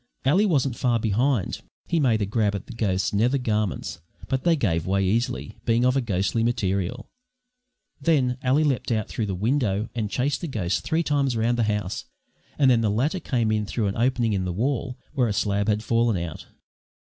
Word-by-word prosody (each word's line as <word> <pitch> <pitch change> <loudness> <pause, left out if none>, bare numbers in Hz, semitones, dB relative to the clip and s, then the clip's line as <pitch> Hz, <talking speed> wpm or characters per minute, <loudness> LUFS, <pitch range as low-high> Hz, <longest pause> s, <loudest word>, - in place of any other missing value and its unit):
Ally 185 +10 +4
wasn't 140 - +1
far 120 -2 +1
behind; 115 +1 0 0.2
he 170 - 0
made 115 -7 +2
a - - +1
grab 105 0 0
at 100 - -5
the - - -9
ghost's 100 -5 0
nether 120 +7 +2
garments, 105 -9 -2 0.3
but 130 -1 -1
they 170 -1 +4
gave 85 - 0
way 95 0 +1
easily, 120 +6 -1
being 115 +1 +2
of 125 +1 +3
a 135 - +2
ghostly 100 0 0
material. 100 0 -1 0.9
Then 135 -5 +2
Ally 135 +4 +3
leapt 135 -4 0
out 110 -3 0
through 110 - -2
the 95 - -2
window 110 -1 0
and 110 -3 -2
chased 135 +6 -1
the 170 - -3
ghost 100 - -1
three 165 +1 0
times 140 -5 +1
round 115 +2 +2
the 120 -2 +1
house, 105 -3 -2 0.5
and 135 -3 +5
then 120 -2 +4
the 110 - +1
latter 135 - 0
came 120 -9 0
in 105 -1 0
through 110 0 -1
an 100 - -1
opening 120 -2 +1
in 95 -2 0
the 90 - -2
wall 125 +5 -1 0.2
where 130 -5 +2
a 105 - -1
slab 100 0 0
had 105 0 +1
fallen 115 -2 +2
out. 85 -2 -6
115 Hz, 200 wpm, -25 LUFS, 105-130 Hz, 0.9 s, and